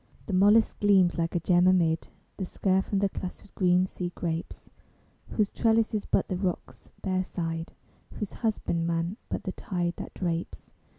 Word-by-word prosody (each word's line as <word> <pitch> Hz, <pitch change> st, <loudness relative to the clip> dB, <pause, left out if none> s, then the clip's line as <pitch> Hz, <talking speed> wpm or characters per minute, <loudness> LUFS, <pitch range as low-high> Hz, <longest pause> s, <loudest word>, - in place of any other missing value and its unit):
The 205 Hz, -, -4 dB
mollusc 205 Hz, +4 st, +4 dB
gleams 190 Hz, -4 st, +4 dB
like 165 Hz, +1 st, -1 dB
a -, -, +3 dB
gem 175 Hz, +2 st, +4 dB
amid 170 Hz, -3 st, +3 dB, 0.3 s
The 190 Hz, -, -2 dB
scurf 190 Hz, +1 st, 0 dB
and 200 Hz, -1 st, +2 dB
the 200 Hz, -, +4 dB
clustered 185 Hz, +1 st, -7 dB
green 180 Hz, -1 st, +3 dB
sea 180 Hz, -1 st, -5 dB
grapes, 165 Hz, -1 st, -4 dB, 0.6 s
Whose 210 Hz, -2 st, 0 dB
trellis 225 Hz, -1 st, +2 dB
is 210 Hz, -, -1 dB
but -, -, +2 dB
the 185 Hz, -, -2 dB
rock's 180 Hz, -2 st, -4 dB
bare 185 Hz, -1 st, +1 dB
side, 165 Hz, -2 st, -4 dB, 0.4 s
Whose 210 Hz, -, -4 dB
husbandman 170 Hz, -4 st, -1 dB
but -, -, -3 dB
the 190 Hz, -, -3 dB
tide 175 Hz, -2 st, -2 dB
that -, -, -7 dB
drapes. 170 Hz, -2 st, -3 dB
185 Hz, 165 wpm, -28 LUFS, 170-200 Hz, 0.6 s, mollusc